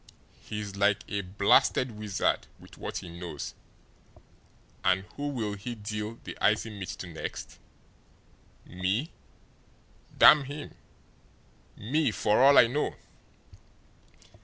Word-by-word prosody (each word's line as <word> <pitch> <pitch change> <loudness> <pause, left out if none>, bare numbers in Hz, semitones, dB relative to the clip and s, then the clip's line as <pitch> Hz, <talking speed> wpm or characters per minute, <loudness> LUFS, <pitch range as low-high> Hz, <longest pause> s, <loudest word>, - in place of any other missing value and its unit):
He's 105 -2 -6
like 100 0 +2
a 100 -1 -1
blasted 100 +6 +3
wizard 105 -2 -1
with - - -15
what - - -5
he 90 - -7
knows. 85 -5 -6 1.3
And 95 +1 +2
who'll 130 -8 -3
he 105 +4 -6
deal 105 +1 -5
the - - -7
icy 110 +1 +2
mitt 100 -3 -7
to - - -6
next? 80 -2 -7 1.1
Me 95 - -2 1.1
damn 145 -2 +8
him 145 +2 -7 1.0
me, 145 +8 +1
for 105 0 +1
all 140 +1 +7
I - - +9
know!" 135 +6 -1
105 Hz, 110 wpm, -28 LUFS, 100-125 Hz, 1.3 s, I